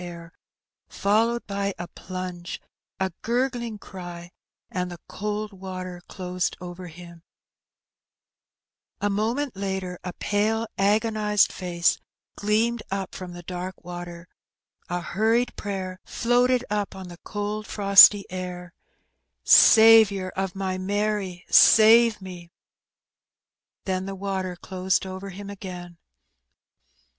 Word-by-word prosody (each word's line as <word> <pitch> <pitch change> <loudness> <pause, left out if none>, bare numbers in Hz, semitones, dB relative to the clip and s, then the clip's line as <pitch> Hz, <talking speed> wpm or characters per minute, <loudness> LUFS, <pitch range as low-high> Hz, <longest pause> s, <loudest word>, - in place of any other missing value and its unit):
51 175 -1 -7
air, 170 0 -13 0.6
followed 225 +4 +1
by 200 -1 -3
a 175 - -6
plunge, 185 -2 -7 0.4
a 190 0 -1
gurgling 240 -2 -1
cry, 175 -3 -9 0.4
and 180 -4 -2
the 175 - -8
cold 210 +1 -4
water 185 -2 -7
closed 180 -1 -3
over 180 0 -8
him, 170 0 -12 1.8
A 205 - 0
moment 230 +6 -1
later 190 -2 -4
a 180 - -5
pale 215 +4 0
agonized 210 0 +2
face 175 -2 0 0.4
gleamed 220 +3 0
up 195 -1 -4
from 180 -1 -8
the 175 0 -10
dark 180 +1 -6
water, 175 -1 -8 0.6
a 175 0 -2
hurried 225 +7 0
prayer 190 -2 -5
floated 245 +1 +1
up 205 -2 -2
on 190 -1 -8
the 175 0 -12
cold 210 +1 -4
frosty 200 0 +7
air, 180 -1 -6 0.7
'^ - - -23
Saviour 220 -4 +7
of 190 0 -4
my 190 -1 -3
Mary, 200 -2 -2
save 225 0 +6
me! 175 -2 -9 0.7
" - - -64
then 190 0 -2
the 195 - -5
water 190 -2 -3
closed 185 +1 -1
over 190 +1 -7
him 200 +2 -8
again. 180 -3 -9
190 Hz, 120 wpm, -25 LUFS, 180-210 Hz, 1.8 s, frosty